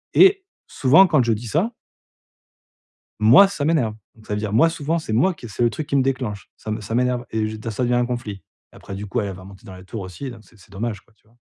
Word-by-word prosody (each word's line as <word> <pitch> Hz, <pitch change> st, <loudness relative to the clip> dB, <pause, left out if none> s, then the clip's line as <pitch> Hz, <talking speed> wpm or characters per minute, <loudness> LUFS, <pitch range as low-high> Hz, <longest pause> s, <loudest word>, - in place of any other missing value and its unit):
et 385 Hz, 0 st, +6 dB, 0.2 s
souvent 150 Hz, +9 st, +5 dB
quand 155 Hz, -7 st, +3 dB
je 115 Hz, -, +2 dB
dis 110 Hz, +3 st, -5 dB
ça 185 Hz, -, 0 dB, 1.5 s
Moi 120 Hz, -, +8 dB
ça 175 Hz, -7 st, -4 dB
m'énerve, 145 Hz, -9 st, +1 dB, 0.2 s
donc 110 Hz, -, -19 dB
ça 105 Hz, -, -2 dB
veut 105 Hz, -, -2 dB
dire, 105 Hz, -1 st, -3 dB
moi 115 Hz, +10 st, +5 dB
souvent 165 Hz, 0 st, -2 dB
c'est 110 Hz, -, -5 dB
moi 165 Hz, +12 st, +3 dB
qui 120 Hz, -7 st, -10 dB
c'est 105 Hz, -, -3 dB
le 120 Hz, -, +4 dB
truc 150 Hz, +6 st, -5 dB
qui -, -, -2 dB
me 135 Hz, -, +4 dB
déclenche. 125 Hz, -7 st, -3 dB
Ça 110 Hz, -, -8 dB
me 110 Hz, -, -3 dB
ça 105 Hz, +2 st, -5 dB
m'énerve, 125 Hz, 0 st, 0 dB
et 110 Hz, -1 st, -1 dB
je 110 Hz, +1 st, -6 dB
ça 110 Hz, +4 st, -3 dB
devient 120 Hz, 0 st, +1 dB
un 120 Hz, 0 st, +2 dB
conflit. 115 Hz, -5 st, -5 dB, 0.3 s
Après, 100 Hz, -, -9 dB
du 105 Hz, +1 st, -6 dB
coup, 120 Hz, +5 st, -1 dB
elle 100 Hz, -2 st, -3 dB
va 95 Hz, -, -12 dB
monter 95 Hz, 0 st, -14 dB
dans 95 Hz, -, -10 dB
les 95 Hz, -, -13 dB
tours 105 Hz, +3 st, -7 dB
aussi, 95 Hz, +8 st, -7 dB
donc 120 Hz, -2 st, -11 dB
c'est 110 Hz, -, -23 dB
c'est 95 Hz, +1 st, -20 dB
dommage 105 Hz, 0 st, -4 dB
quoi, 115 Hz, -, -31 dB
tu 110 Hz, -, -33 dB
vois? 115 Hz, -, -28 dB
115 Hz, 265 wpm, -22 LUFS, 105-135 Hz, 1.5 s, Moi